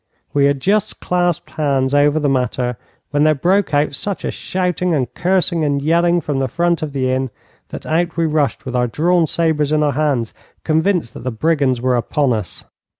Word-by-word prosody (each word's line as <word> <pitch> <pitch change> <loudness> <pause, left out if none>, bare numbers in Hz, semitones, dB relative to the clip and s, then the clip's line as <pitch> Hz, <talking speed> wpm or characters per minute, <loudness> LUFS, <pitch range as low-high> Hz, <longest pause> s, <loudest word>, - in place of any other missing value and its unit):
We 140 -1 +3
had 140 -1 +2
just 205 +4 0
clasped 175 -2 -1
hands 140 -3 0
over 145 +2 +3
the 145 - 0
matter 125 -2 0 0.4
when 145 0 +2
there 155 0 +4
broke 185 +6 +1
out 145 0 +1
such 200 +7 -3
a - - -1
shouting 180 -2 -1
and 130 -5 -2
cursing 180 -2 0
and 145 -1 +1
yelling 170 +4 +2
from 145 -2 -2
the 135 - 0
front 170 +5 0
of 155 -2 -3
the 130 -2 -1
inn, 130 0 -1 0.4
that - - -8
out 170 +1 -1
we 165 - +2
rushed 150 -5 0
with 130 -1 -4
our 125 0 +2
drawn 165 +6 +2
sabres 155 -3 +1
in 155 0 +2
our 145 - +2
hands, 140 -6 -1 0.3
convinced 160 - +1
that - - -9
the 130 - -1
brigands 130 0 0
were 130 0 +2
upon 125 +2 +1
us. 110 -2 -4
150 Hz, 200 wpm, -18 LUFS, 135-170 Hz, 0.4 s, there